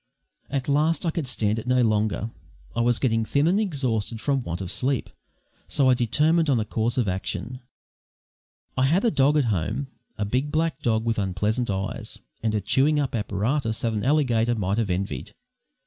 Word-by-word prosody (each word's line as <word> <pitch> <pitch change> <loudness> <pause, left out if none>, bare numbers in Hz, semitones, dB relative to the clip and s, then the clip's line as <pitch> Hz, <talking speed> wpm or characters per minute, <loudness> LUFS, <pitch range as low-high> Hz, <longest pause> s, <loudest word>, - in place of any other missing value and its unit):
At 135 -2 -2
last 155 +5 +2
I 165 - +2
could 160 -4 -3
stand 110 -3 +1
it 115 - -9
no 125 0 +3
longer. 110 0 0 0.4
I 115 - +1
was 120 0 +3
getting 115 -4 +1
thin 140 +6 +1
and 185 +5 +3
exhausted 125 - -1
from 135 +2 0
want 85 -6 -4
of 95 -2 -5
sleep, 130 -1 0 0.6
so 135 -3 +3
I - - +6
determined 150 +7 +2
on 130 -4 +3
a 110 - -1
course 115 +3 -1
of 120 -5 +1
action. 105 +6 -3 1.2
I 130 - +2
had 170 - +2
a 230 - +4
dog 145 0 +3
at 145 - +3
home, 110 - -1 0.3
a 105 - -1
big 130 +7 -1
black 155 -2 0
dog 110 -4 +1
with 115 -1 0
unpleasant 105 +5 -1
eyes, 95 0 -3 0.2
and 110 0 0
a 105 - 0
chewing 140 +9 +2
up 140 -3 -1
apparatus 110 +3 -1
that 115 -1 0
an 105 - -2
alligator 120 -5 +2
might 100 0 -1
have 110 -4 0
envied. 90 -7 -3
120 Hz, 190 wpm, -25 LUFS, 110-140 Hz, 1.2 s, I